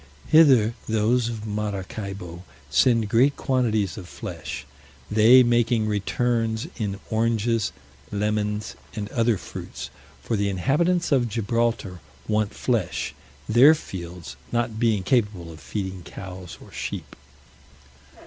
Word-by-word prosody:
Hither 130 -9 +6 0.2
those 115 +2 +2
of 110 -2 -5
Maracaibo 100 -3 -5 0.3
send 115 - +4
great 125 +7 +4
quantities 110 -7 0
of 90 - -10
flesh, 70 - -6 0.5
they 115 +4 +7
making 120 -2 +2
returns 110 +2 0
in 100 -3 -3
oranges, 115 0 +1 0.4
lemons, 105 0 -1 0.2
and 105 -1 -4
other 115 -2 +2
fruits; - - -8 0.3
for 115 - -1
the 100 -1 +1
inhabitants 165 - +1
of 125 -4 +3
Gibraltar 115 -4 -1 0.3
want 105 -1 +1
flesh, 115 -8 -1 0.3
their 130 +8 +7
fields 85 - -8
not 115 -2 -1
being 110 -5 +2
capable 105 -7 0
of 80 - -12
feeding 95 -2 -5
cows 90 0 -9
or - - -15
sheep. - - -5
110 Hz, 115 wpm, -24 LUFS, 100-120 Hz, 0.5 s, they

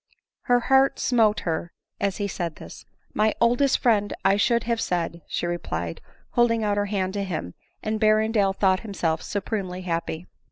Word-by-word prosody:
Her 245 0 +5
heart 270 +2 +4
smote 225 -4 +2
her 170 0 -3 0.3
as 200 -1 -1
he 205 - -1
said 175 -4 -4
this. - - -11 0.3
"My 215 0 +2
oldest 245 +3 +3
friend 210 -4 +2
I 195 +1 +5
should 235 +3 +2
have 230 -1 -1
said," 170 -1 -2
she - - -2
replied, 85 - -3 0.3
holding 230 -2 +2
out 205 -1 +1
her - - +2
r - - -6
hand 190 -2 -1
to 200 -1 -2
him; 155 - -4 0.3
and 215 0 -1
Berrendale 215 -2 +3
thought 190 -2 +3
himself 175 -7 -2
supremely 195 -3 -3
happy. 170 -1 -3
205 Hz, 170 wpm, -25 LUFS, 180-225 Hz, 0.3 s, Her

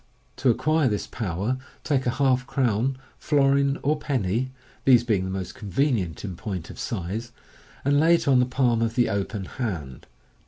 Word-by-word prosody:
To 130 - +2
acquire 155 +4 +2
this 105 -4 -1
power, 105 +4 -2 0.2
take 135 -4 0
a 120 - -1
half 130 -2 +2
crown, 130 -1 +1 0.2
florin, 140 -1 +3
or 150 +2 +1
penny 125 -3 -1 0.3
(these 125 -3 +6
being 105 -6 +1
the - - -4
most 95 -1 -4
convenient 105 - -1
in 95 -3 -5
point 90 -2 -5
of - - -12
size), 110 +3 -4 0.5
and 145 +1 +4
lay 165 +3 +6
it 165 - -2
on 130 -2 +5
the 125 - +3
palm 125 -3 +2
of 115 0 0
the 120 - +3
open 100 0 -2
hand. 85 - -5
120 Hz, 170 wpm, -25 LUFS, 100-135 Hz, 0.5 s, these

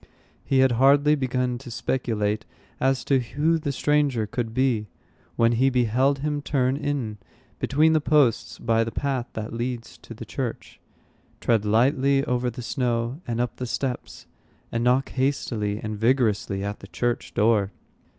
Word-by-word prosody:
He 135 - +1
had 130 -1 +4
hardly 145 +2 +5
begun 125 -3 -1
to 130 -1 -10
speculate 115 -4 -1 0.4
as 130 -1 +1
to 135 -2 +3
who 150 +7 0
the 150 -2 -2
stranger 140 -5 +1
could 115 +2 -3
be, 120 -3 +1 0.5
when 115 0 +3
he 130 +3 +3
beheld 130 +2 +2
him 150 -1 -1
turn 130 -2 +1
in 140 -7 -3 0.4
between 155 +3 +3
the 155 - +3
posts 145 -6 +2
by 115 -1 +1
the 115 - -3
path 130 -3 -2
that 110 0 -5
leads 120 0 -4
to - - -11
the - - -8
church, - - -5 0.6
tread 115 -3 +1
lightly 135 +5 +3
over 125 0 0
the 120 +1 -7
snow, 120 +3 -1
and 120 -1 -2
up 120 -1 -2
the 125 - -4
steps, 125 +1 -4 0.5
and 115 0 -1
knock 125 +2 +2
hastily 120 -6 -1
and 110 -1 -5
vigorously 110 -5 +1
at 100 +1 -4
the 100 - -11
church 120 +3 -2
door. 105 -2 +3
125 Hz, 160 wpm, -25 LUFS, 115-135 Hz, 0.6 s, hardly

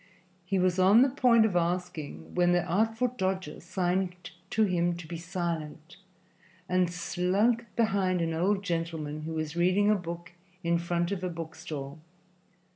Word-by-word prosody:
He 195 +1 0
was 185 0 +2
on 200 +6 +7
the 270 - +3
point 240 -4 +5
of 205 -5 0
asking, 175 -3 -2
when 175 0 +3
the 175 -1 +2
Artful 225 +7 +1
Dodger 190 -8 -3
signed 180 0 -2 0.2
to 220 - +2
him 175 -3 +1
to 175 - -8
be 170 +1 -6
silent, 165 -2 -4 0.7
and 180 -1 +2
slunk 195 +7 +1
behind 195 -5 +2
an 165 -1 0
old 195 +5 +1
gentleman 165 -4 -3
who 160 - -4
was 155 0 -3
reading 185 +4 +3
a - - +4
book 170 -2 -6 0.3
in 170 0 +2
front 170 +1 -1
of 190 -2 -3
a 180 - -1
book 165 -2 -6
stall. 150 -3 -7
180 Hz, 160 wpm, -29 LUFS, 170-195 Hz, 0.7 s, on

